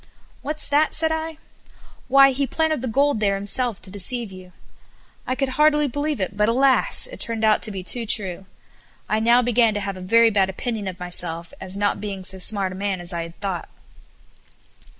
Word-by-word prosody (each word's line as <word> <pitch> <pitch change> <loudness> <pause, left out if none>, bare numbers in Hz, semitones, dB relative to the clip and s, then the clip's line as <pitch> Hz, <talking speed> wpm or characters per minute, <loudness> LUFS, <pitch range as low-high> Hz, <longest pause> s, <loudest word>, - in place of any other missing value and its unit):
"What's 305 +1 -2
that?" 295 +2 +2
said 320 0 +1
I, 320 0 -4 0.7
"Why, 275 +1 +6
he 275 +1 -1
planted 315 -3 0
the 260 - -3
gold 275 +1 +1
there 200 -2 +1
himself 205 +2 -1
to 185 - -8
deceive 210 +3 -1
you." 185 -1 -12 0.8
I 255 - -1
could 275 0 -1
hardly 300 +2 +3
believe 290 +1 -3
it; 190 +1 -3
but, 210 +1 +2
alas! 270 - +3
it - - -10
turned 230 -1 -1
out 215 -1 +3
to 220 - +2
be 190 -2 -6
too 230 +4 0
true. 190 -3 -1 0.6
I 215 - 0
now 235 +2 +4
began 235 -2 +2
to - - -1
have 195 -1 -5
a - - -9
very 230 +5 +4
bad 195 -2 +2
opinion 215 +1 -4
of 185 -1 -6
myself 170 -2 -3
as 190 +1 +3
not 205 0 0
being 200 -2 -5
so 190 0 +1
smart 195 0 +2
a - - -8
man 195 -1 -3
as 175 +1 -3
I 170 - -3
had 165 0 -10
thought. 190 -4 -4
215 Hz, 200 wpm, -22 LUFS, 190-260 Hz, 0.8 s, Why